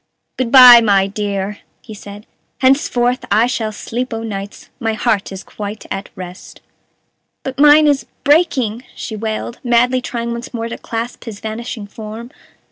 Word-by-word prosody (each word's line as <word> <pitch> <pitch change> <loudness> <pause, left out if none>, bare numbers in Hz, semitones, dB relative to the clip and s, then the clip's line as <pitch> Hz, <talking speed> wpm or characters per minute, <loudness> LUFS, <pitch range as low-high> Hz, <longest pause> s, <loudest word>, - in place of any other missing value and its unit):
"Good 255 -3 -2
by, 250 -3 +10
my 200 -3 +3
dear!" 200 0 -3 0.2
he 220 - -10
said; 205 +1 -11 0.4
"henceforth 255 -2 +2
I 215 +3 +4
shall 230 -3 -2
sleep 235 +3 -4
o' 225 - -5
nights; 200 -2 -7
my 225 -3 -1
heart 210 -2 0
is 190 0 -7
quite 210 +1 -7
at 195 +1 -4
rest." 185 0 -10 0.8
"But 265 0 -6
mine 295 +1 +7
is 285 -2 +1 0.2
breaking," 265 -7 +2
she 220 - -6
wailed, 220 +2 -4
madly 250 +1 +2
trying 235 -1 -4
once 235 +1 -6
more 230 0 -3
to - - -7
clasp 230 +2 -5
his 215 -4 -7
vanishing 220 0 -6
form. 220 +3 -9
230 Hz, 155 wpm, -17 LUFS, 210-250 Hz, 0.8 s, by